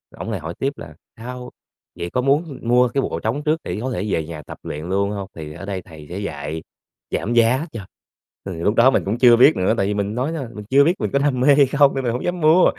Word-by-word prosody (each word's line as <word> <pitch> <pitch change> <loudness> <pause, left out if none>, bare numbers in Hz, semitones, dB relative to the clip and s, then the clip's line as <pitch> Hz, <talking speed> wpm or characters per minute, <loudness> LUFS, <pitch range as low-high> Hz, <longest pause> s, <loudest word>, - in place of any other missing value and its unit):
ổng - - -6
lại 100 - -2
hỏi 80 +1 -6
tiếp 135 +1 -1
là 80 - -10 0.2
"Sao? 125 +2 -7 0.5
Vậy 85 - -3
có 125 - 0
muốn 140 +1 0
mua 125 +2 +4
cái 135 +3 0
bộ 85 - -3
trống 115 - -2
trước 155 +1 +1
để 90 +4 -4
có 130 - -3
thể 105 -4 -2
về 80 -4 0
nhà 80 -1 -7
tập - - -10
luyện 75 +2 -6
luôn 100 +2 0
hông?" 100 -2 -5
Thì 75 -2 -7
ở 100 - -9
đây 95 -2 -4
thầy 80 -4 -13
sẽ 90 - -5
dạy 80 -4 -5 0.5
giảm 115 - -1
giá 120 +5 +3
cho, 110 -7 -7 0.6
thì 95 - -4
lúc 90 +6 0
đó 125 +3 +6
mình - - +1
cũng 100 +4 -1
chưa 120 -2 +7
biết 130 +6 +6
nữa, 95 +4 +1
tại 100 - +1
vì 105 - 0
mình 100 +1 -2
nói, 130 +6 -1
đó, 160 - -3
mình 105 -1 -8
chưa 140 +2 +6
biết 165 +4 +3
mình - - 0
có 140 - +3
đam 140 -3 +1
mê 140 +3 +5
hay 145 -1 +6
không 140 +1 +3
nên 135 - -2
mình 120 -2 0
hổng 125 - -3
dám 175 0 -2
mua. 160 +4 +6
115 Hz, 275 wpm, -21 LUFS, 95-135 Hz, 0.6 s, chưa